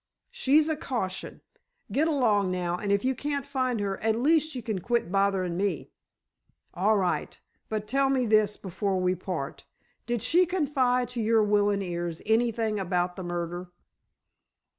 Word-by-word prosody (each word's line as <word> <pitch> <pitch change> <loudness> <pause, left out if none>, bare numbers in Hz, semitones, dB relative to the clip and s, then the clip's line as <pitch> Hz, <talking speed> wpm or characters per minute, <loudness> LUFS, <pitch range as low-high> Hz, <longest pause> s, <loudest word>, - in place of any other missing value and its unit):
"She's 300 +3 +3
a 315 - 0
caution! 235 -11 -4 0.5
Get 310 +3 +2
along 220 - +2
now, 180 -1 -1
and 200 +2 -3
if 200 +4 +1
you 260 - +2
can't 285 +1 -3
find 255 -4 -1
her, 195 -1 -2
at 220 0 +2
least 310 +4 +2
you 250 - -5
can 215 -4 -2
quit 235 -2 -1
botherin' 195 -3 +1
me." 190 -4 -2 0.8
"All 210 +4 +2
right. 185 -2 -1 0.3
But 215 -1 -3
tell 275 +3 +2
me 260 -2 +2
this, 215 -2 +3
before 190 0 -2
we 180 0 +2
part. 175 -5 -5 0.4
Did 240 -3 -1
she 355 +2 +4
confide 265 -8 +1
to 245 -2 -3
your 220 0 +3
willin' 205 -1 +2
ears 175 -2 -4
anything 225 -1 +1
about 180 -1 -1
the 190 - -6
murder?" 175 0 -4
210 Hz, 160 wpm, -27 LUFS, 185-255 Hz, 0.8 s, she